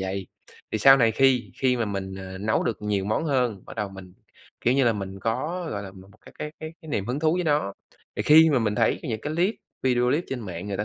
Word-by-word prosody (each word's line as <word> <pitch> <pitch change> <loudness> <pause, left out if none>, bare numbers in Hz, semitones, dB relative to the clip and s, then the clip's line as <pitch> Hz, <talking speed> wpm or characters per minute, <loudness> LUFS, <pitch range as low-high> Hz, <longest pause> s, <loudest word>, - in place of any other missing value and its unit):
vầy. 95 -1 -5 0.5
Thì 110 - 0
sau 135 +5 +8
này 115 -3 +4
khi 130 -1 +3
khi 130 -2 +3
mà 115 - 0
mình, 95 -2 -4
ờ, 95 0 -8
nấu 110 +2 +1
được 110 - -3
nhiều 100 -2 0
món 110 +10 0
hơn, 125 - 0
bắt - - -10
đầu 105 -2 -2
mình, 95 -2 -12 0.5
kiểu 120 - +2
như 135 -2 +3
là, 115 - +4
mình 95 -2 -6
có, 150 - -2
gọi 100 -1 -4
là, 95 - -8
một 95 0 -14 0.2
cái - - -12
cái 150 - -5
cái 155 0 -6
cái 160 - -12
niềm 100 -8 -2
hứng 125 +4 -2
thú 160 +1 +3
với 180 - -1
nó. 145 -10 +1 0.4
Thì - - 0
khi 160 +2 +7
mà 140 - +3
mình 110 -3 0
thấy 115 0 +1
những 110 -3 -3
cái 150 - -4
clip 185 +6 +2 0.3
video 125 -1 +2
clip 165 +4 +1
trên 135 -2 -4
mạng 90 -3 -6
người 100 - -2
ta 105 - -2
115 Hz, 265 wpm, -25 LUFS, 100-140 Hz, 0.5 s, sau